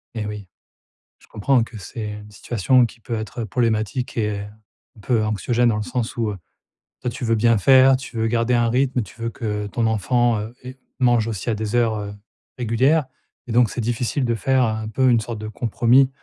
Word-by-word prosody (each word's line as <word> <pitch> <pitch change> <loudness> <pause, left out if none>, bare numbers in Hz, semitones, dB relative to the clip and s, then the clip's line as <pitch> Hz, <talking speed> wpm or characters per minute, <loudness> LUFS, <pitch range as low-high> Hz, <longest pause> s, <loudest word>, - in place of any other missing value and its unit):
Et 105 -2 -3
oui. 105 -2 -6 0.7
Je - - -22
comprends 135 -4 +2
que 115 -1 -7
c'est 105 +3 -6
une 105 0 -10
situation 120 +4 +2
qui 115 0 -6
peut 115 +1 -5
être 110 +1 -4
problématique 115 +2 -1
et 105 -2 -1
un 105 +1 -15
peu 115 -1 +1
anxiogène 120 +3 +1
dans 110 - +1
le 105 - -2
sens 125 -1 -3
où, 115 -2 0
heu, 100 - -5 0.7
toi 125 - -1
tu 130 - -7
veux 115 -1 +2
bien 115 +1 +3
faire, 130 +4 +6
tu 130 -3 -9
veux 110 0 +1
garder 115 +1 +1
un 120 -1 +2
rythme, 130 0 +1
tu 110 +4 -14
veux 115 - -1
que 105 -3 -4
ton 115 +3 -1
enfant, 115 +2 +1
heu, 110 +4 -7
ait 130 +1 -9 0.2
mange 120 -3 +3
aussi 110 +1 -4
à 110 - +1
des 110 +2 -3
heures, 115 -2 +2
heu, 100 0 -6 0.4
régulières 130 +6 +2 0.4
et - - -5
donc 120 -2 +4
c'est 120 - -4
difficile 120 +4 -1
de 120 - +1
faire 130 +4 +2
un 110 -1 -1
peu 130 +4 +2
une 120 -2 +4
sorte 110 0 -5
de 110 - -6
compromis 120 +4 +3
115 Hz, 210 wpm, -22 LUFS, 110-125 Hz, 0.7 s, faire